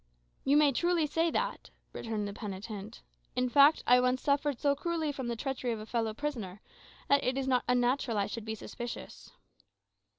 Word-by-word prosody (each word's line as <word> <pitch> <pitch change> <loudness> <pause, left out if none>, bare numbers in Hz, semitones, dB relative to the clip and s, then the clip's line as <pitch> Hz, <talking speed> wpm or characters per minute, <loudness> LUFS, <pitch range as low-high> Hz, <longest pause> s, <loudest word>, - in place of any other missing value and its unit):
"You 280 +2 +4
may 295 -2 +5
truly 345 +4 +2
say 325 +3 +1
that," - - -2 0.2
returned 215 -3 -3
the 200 - -5
penitent. 205 0 -7 0.3
"In 250 0 +1
fact, 285 +4 +6
I 250 0 +6
once 250 +1 +1
suffered 285 -2 +1
so 285 -1 +2
cruelly 320 0 -1
from 265 -3 -5
the 235 - -2
treachery 260 0 -3
of 220 - -5
a 215 - -7
fellow 225 -1 -1
prisoner, 225 -10 -4 0.5
that 280 0 +4
it 255 +1 0
is 270 -1 -1
not 255 -2 +2
unnatural 245 -1 +1
I 200 - +2
should 230 +2 -5
be 220 0 -3
suspicious." 240 +2 -8
250 Hz, 185 wpm, -31 LUFS, 225-285 Hz, 0.5 s, fact